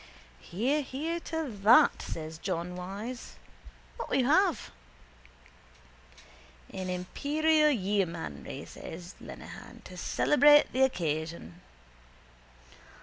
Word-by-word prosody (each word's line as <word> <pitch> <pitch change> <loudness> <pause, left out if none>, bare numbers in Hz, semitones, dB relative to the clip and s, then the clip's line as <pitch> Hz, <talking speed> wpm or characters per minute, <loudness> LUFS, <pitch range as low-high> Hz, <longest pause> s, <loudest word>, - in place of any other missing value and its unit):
—Hear, 245 - -1
hear 310 +5 -3
to 320 -1 -3
that, 235 +9 +6
says 160 0 -6
John 180 -1 -3
Wyse. 200 +7 -7 0.6
What - - -5
will - - +1
you 260 - +2
have? 345 +5 +2 2.0
—An 185 -1 -4
imperial 300 - +2
yeomanry, 185 - -2
says 175 +3 -9
Lenehan, - - -11
to - - -11
celebrate 295 0 +4
the 260 - +1
occasion. 160 - -1
210 Hz, 90 wpm, -29 LUFS, 175-295 Hz, 2.0 s, that